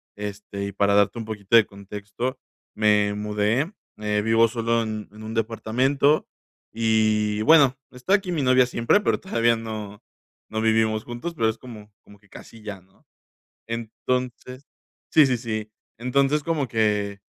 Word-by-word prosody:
este, 100 -1 -6
y - - -5
para 100 +1 +2
darte 100 +2 +3
un 115 - -5
poquito 105 0 -1
de 115 - +7
contexto, 105 +6 -6 0.4
me 105 -1 +3
mudé, 105 - 0 0.2
eh, 105 -1 -1
vivo 115 +1 +4
solo 115 0 0
en 110 -1 -5
en 110 +1 -12
un 110 - -6
departamento 120 +6 +1 0.4
y 110 -2 +1
bueno, 140 -1 +6
está 125 +10 -2
aquí 195 -3 +2
mi 155 -5 -1
novia 130 -1 +4
siempre, 115 - +2
pero - - +1
todavía 115 -10 +1
no 110 -2 -7 0.5
no 110 0 -2
vivimos 110 -1 +2
juntos, 120 +8 -5
pero 115 -8 +1
es 110 - -4
como 110 -4 -12
como 105 0 -18
que 100 -1 -27
casi 115 +3 -13
ya, 105 -3 -7
¿no? 95 +2 -29 0.6
Entonces 125 +3 -4 0.5
Sí, 155 -2 +7
sí, 125 -2 +1
sí. 110 -2 -4 0.3
Entonces, 140 +5 +1
como 155 -4 -1
que 105 -3 0
110 Hz, 155 wpm, -24 LUFS, 105-125 Hz, 0.6 s, de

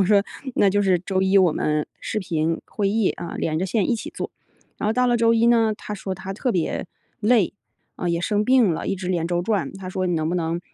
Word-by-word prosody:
我 195 - +4
说： 200 -1 +5 0.3
“那 200 - +4
就 205 +1 +2
是 185 -3 +3
周 190 +1 -1
一 190 +1 +3
我 180 -4 +4
们 150 0 0
视 215 - -2
频 165 -3 -1
会 200 -2 -1
议 215 -1 +2
啊， 170 - -7
连 155 0 -1
着 190 - -1
线 200 0 0
一 - - +3
起 - - -7
做。” - - -5 0.5
然 - - -2
后 - - +2
到 250 +1 +2
了 240 -1 +3
周 230 0 +4
一 230 +1 +3
呢， 225 -2 +4
他 210 - -6
说 195 -1 -5
他 190 +1 -6
特 250 +4 -1
别 175 +1 -1 0.3
累， 215 -3 +3 0.4
啊， 175 - -2
也 170 0 0
生 210 +3 +1
病 250 -7 +4
了， - - -4
一 195 - 0
直 180 0 -6
连 170 -3 0
轴 175 0 0
转， 205 -1 -1
他 190 -1 -7
说： 185 0 -2
“你 175 - +1
能 155 -1 0
不 175 - -1
能， 170 0 -1
190 Hz, 275 characters per minute, -23 LUFS, 175-215 Hz, 0.5 s, 说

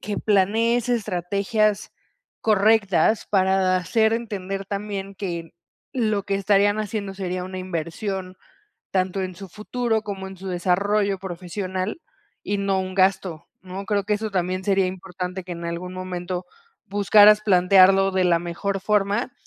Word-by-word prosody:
que 205 0 -3
planees 225 +4 +2
estrategias 210 0 0 0.5
correctas, 210 -2 +3
para 190 -1 +3
hacer 220 +5 +2
entender, 195 -4 -4
también, 200 -1 -5
que 170 -4 -5 0.4
lo 215 -5 0
que 195 0 -1
estarían 205 +1 +3
haciendo, 205 -2 -3
sería 185 -2 -3
una 185 0 -6
inversión, 185 +2 -4 0.5
tanto 185 0 0
en 185 -2 -5
su 195 0 -9
futuro, 220 +3 -2
como 195 -3 -6
en 190 0 -9
su 190 +1 -8
desarrollo 195 +3 +1
profesional, 185 - -4 0.4
y 205 - -2
no 195 -1 +1
un 185 0 -5
gasto, 185 -4 +1 0.2
¿no? 190 +1 -7
Creo 205 -1 0
que 210 +2 0
eso, 215 0 -4
también 185 0 -1
sería 195 -1 +2
importante. 185 0 -5
Que 180 - -6
en 170 0 -6
algún 175 +2 -5
momento, 180 -1 -5 0.4
buscaras 205 +1 +5
plantearlo, 195 0 +5
de 185 -1 +1
la 170 -1 +3
mejor 190 +3 -3
forma, 210 +4 0
195 Hz, 140 wpm, -23 LUFS, 185-205 Hz, 0.5 s, buscaras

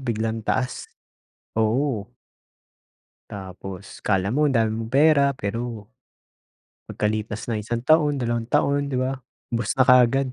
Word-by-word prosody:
Biglang 115 -3 -2
taas, 130 0 -1 0.7
oo. 110 0 +1 1.2
Tapos, 95 0 -9
akala 95 -1 +1
mo 145 +7 +2
ang 140 - +2
dami 115 -2 +2
mong 110 +1 -4
pera, 145 0 +5
pero 115 -1 -5 1.0
pagkalipas 110 +1 -2
ng 110 - -1
isang 115 +3 -4
taon, 150 0 +4
dalawang 120 -2 -2
taon, 140 +2 +1
'di 130 - -2
ba? 130 +1 -1 0.3
Ubos 115 -2 -1
na 130 - +5
kaagad. 125 +1 +4
120 Hz, 130 wpm, -23 LUFS, 110-135 Hz, 1.2 s, pera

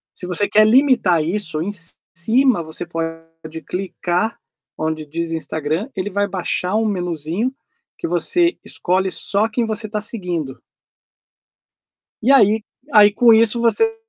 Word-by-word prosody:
Se 180 - -5
você 185 +3 0
quer 215 0 +4
limitar 230 - +3
isso, 165 -3 -2
em 195 +5 -2
ci 170 -4 +1 0.2
cima 230 +4 +2
você 160 +1 -6
pode 165 -1 -7
clicar 180 +2 -2 0.4
onde 155 0 -3
diz 165 +2 -4
Instagram, 160 - -3
ele 195 +2 -3
vai 200 +1 0
baixar 185 0 -2
um 220 0 +1
menuzinho 180 - -2 0.5
que - - -4
você 340 - +2
escolhe 185 +1 -1
só 205 +3 +1
quem 230 +1 -1
você 215 0 -3
tá 210 0 -2
seguindo. 180 - -3 1.6
E 255 +5 +3
aí 215 -4 +4 0.3
aí 210 -1 +7
com 235 0 +5
isso 225 +1 +4
você 450 - +3
190 Hz, 140 wpm, -19 LUFS, 165-220 Hz, 1.6 s, aí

